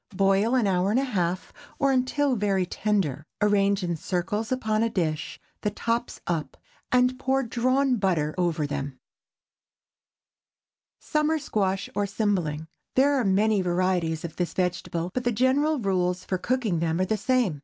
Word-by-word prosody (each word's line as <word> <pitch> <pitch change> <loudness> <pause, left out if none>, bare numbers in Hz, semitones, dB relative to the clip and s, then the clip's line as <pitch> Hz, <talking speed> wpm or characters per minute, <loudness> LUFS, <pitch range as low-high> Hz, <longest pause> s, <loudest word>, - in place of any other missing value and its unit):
Boil 195 +5 +3
an 245 -4 +3
hour 185 -1 +2
and 225 +5 +3
a - - +1
half, 185 -8 -2 0.2
or 275 -1 +2
until 265 +1 +1
very 195 -3 +1
tender. 180 -8 -1 0.2
Arrange 200 -1 +2
in 170 -1 -1
circles 190 - -2
upon 220 -4 0
a 230 - +2
dish, 160 -6 -2 0.2
the 210 - 0
tops 230 +3 -2
up, 165 -3 -3 0.3
and 250 +1 +3
pour 270 0 +1
drawn 255 +2 +1
butter 170 -7 0
over 170 -4 0
them. 140 -2 -4 2.0
SUMMER 305 +1 0
SQUASH 195 -9 -1
OR 205 0 0
CYMBLING. 180 -7 -1 0.3
There 280 +2 +4
are 270 -3 +2
many 205 +1 +3
varieties 175 -2 0
of 165 - -8
this 175 -1 -2
vegetable, 175 -1 -2
but 250 - -2
the 240 - +1
general 265 +7 +2
rules 185 -5 0
for 185 - -2
cooking 230 -7 0
them 165 +1 0
are 185 - +2
the 215 - 0
same. 220 - +1
200 Hz, 155 wpm, -26 LUFS, 180-250 Hz, 2.0 s, There